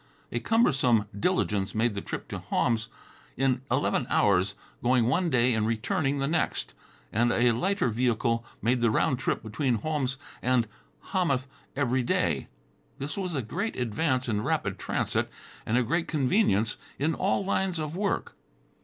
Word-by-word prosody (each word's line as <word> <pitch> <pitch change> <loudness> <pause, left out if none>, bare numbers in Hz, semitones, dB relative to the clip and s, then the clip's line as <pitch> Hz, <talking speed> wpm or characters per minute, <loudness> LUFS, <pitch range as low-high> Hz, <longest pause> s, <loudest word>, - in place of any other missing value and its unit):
A 120 - -1
cumbersome 130 - +3
diligence 105 - 0
made 115 +1 +2
the 100 - -3
trip - - -5
to - - -4
Homs 110 -2 0 0.5
in 130 -1 +2
eleven 130 0 +1
hours, 95 0 +3 0.3
going 125 -1 +3
one 170 +9 +2
day 125 -2 +3
and 110 -1 +1
returning 135 +5 0
the 135 - 0
next, 160 +3 -1 0.4
and 120 +3 +3
a 120 +1 +4
lighter 190 - +1
vehicle 115 0 +1 0.2
made 120 +2 +2
the 115 - +4
round 125 +3 +2
trip - - -1
between 120 +3 0
Homs 135 +2 -1 0.2
and 125 -2 +2 0.5
Hamath 155 -9 +1 0.3
every 130 -2 +1
day. 120 - 0 0.5
This 140 +3 -4
was 185 -4 -3
a 135 - -1
great 195 - -3
advance 130 +2 0
in 105 -3 0
rapid 125 -7 -1
transit - - -1 0.4
and 115 - +2
a 125 - +3
great 165 +8 0
convenience 130 - +2 0.2
in 155 +4 +1
all 195 +3 0
lines 190 -2 0
of 155 0 -3
work. 200 +1 -1
125 Hz, 155 wpm, -28 LUFS, 115-155 Hz, 0.5 s, a